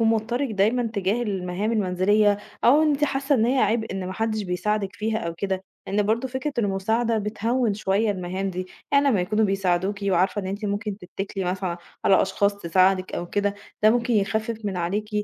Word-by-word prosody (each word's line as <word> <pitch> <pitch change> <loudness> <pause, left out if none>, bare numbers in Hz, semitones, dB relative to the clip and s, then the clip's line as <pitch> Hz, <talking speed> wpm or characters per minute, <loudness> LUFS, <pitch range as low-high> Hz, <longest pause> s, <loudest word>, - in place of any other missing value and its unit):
ومُوترِك 225 +4 +1
دايمًا 215 +4 +2
تجاه 200 +3 0
المهام 195 0 -2
المنزلية 205 +1 +2 0.3
أو 285 +6 +6
إن 310 - +3
أنتِ 290 0 +2
حاسة 275 0 0
إن 225 -4 +3
هي 260 +2 +2
عبء 220 -1 +1
إن 190 -1 -4
ما 185 - -4
حدش 220 +1 -1
بيساعدِك 200 +2 -1
فيها 220 +2 -1
أو 170 -6 -4
كده، 190 +1 -2 0.2
لأن 205 +2 +1
برضه 225 +5 0
فكرة 260 +3 -3
المساعدة 220 +3 +1
بتهوِّن 220 +2 0
شوية 205 +1 +1
المهام 190 0 -3
دي، 185 0 -4 0.3
يعني 280 0 +5
أمّا 215 -8 +3
يكونوا 210 +5 +1
بيساعدوكِ 195 0 0
وعارفة 190 +1 +2
إن 190 - -6
أنتِ 200 +3 -4
ممكن 205 0 -2
تتكلي 195 +1 -5
مثلًا 180 -1 -2 0.3
على 190 - +5
أشخاص 200 +1 +1
تساعدِك 185 +1 +2
أو 175 - -3
كده، 205 +2 0 0.3
ده 215 - +7
ممكن 240 +1 +1
يخفف 220 +2 0
من 200 -3 -2
عليكِ 200 +5 -2
205 Hz, 185 wpm, -24 LUFS, 190-225 Hz, 0.3 s, ده